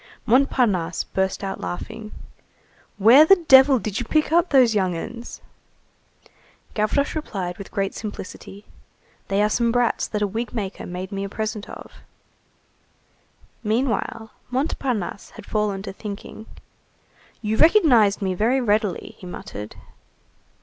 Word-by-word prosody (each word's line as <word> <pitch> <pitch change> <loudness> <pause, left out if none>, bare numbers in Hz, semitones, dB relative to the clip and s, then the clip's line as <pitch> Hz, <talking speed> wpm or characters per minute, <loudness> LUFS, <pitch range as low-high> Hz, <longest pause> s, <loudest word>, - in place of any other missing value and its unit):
Montparnasse 225 - +2
burst 190 +1 -2
out 195 - -4
laughing:— 215 +4 -6 0.9
"Where 230 +9 +8
the 390 +5 +7
devil 270 -6 +6
did 215 -3 -3
you 245 - -3
pick 310 +3 +1
up 345 +2 +3
those 255 -5 +5
young 185 -4 0
'uns?" 235 +7 -8 1.3
Gavroche 215 +7 0
replied 190 - -4
with 200 - -8
great 195 -1 -2
simplicity:— 205 -1 -8 0.6
"They 200 +1 +1
are - - +4
some 235 +1 +1
brats 245 0 +1
that 210 -1 -2
a - - +3
wig 225 +5 -4
maker 200 -4 -4
made 180 +2 -6
me 195 0 -3
a 200 - -4
present 215 0 -4
of." - - -10 1.7
Meanwhile, 225 0 -1 0.2
Montparnasse 250 - -2
had - - -11
fallen 210 -2 -1
to 195 - -6
thinking:— 210 +2 -8 1.0
"You 215 +1 -1
recognized 250 - +5
me 190 -1 0
very 230 +8 +1
readily," 210 -5 -1
he 185 - -10
muttered. 105 - -8
215 Hz, 130 wpm, -23 LUFS, 195-250 Hz, 1.7 s, Where